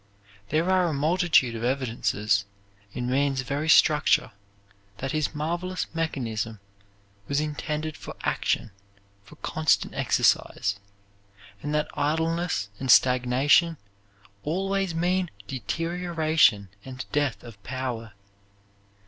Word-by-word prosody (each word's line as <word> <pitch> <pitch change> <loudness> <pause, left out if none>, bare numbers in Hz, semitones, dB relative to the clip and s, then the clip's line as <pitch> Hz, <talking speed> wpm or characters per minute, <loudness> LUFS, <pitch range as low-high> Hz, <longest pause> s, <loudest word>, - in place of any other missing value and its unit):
There 160 +4 +1
are 185 -1 +3
a 160 - -1
multitude 155 -3 +3
of 115 - -5
evidences 115 -5 0 0.5
in 120 +3 -4
man's 135 +1 +1
very 145 +4 -3
structure 150 0 +4 0.7
that 135 +5 -3
his 155 0 -1
marvelous 175 +4 -2
mechanism 115 -9 -3 0.7
was 140 0 +1
intended 155 +1 -3
for - - -9
action, 115 - 0 0.5
for 95 - -15
constant 155 -2 0
exercise, 100 0 +1 0.8
and 145 - -4
that 150 - +1
idleness 160 - 0
and 130 - -4
stagnation 130 +7 +4 0.6
always 195 - -1
mean 180 +1 +1 0.2
deterioration 160 - +1
and 130 0 -7
death 145 -4 0
of 115 -5 -12
power. 120 -4 -5
145 Hz, 105 wpm, -26 LUFS, 125-165 Hz, 0.8 s, structure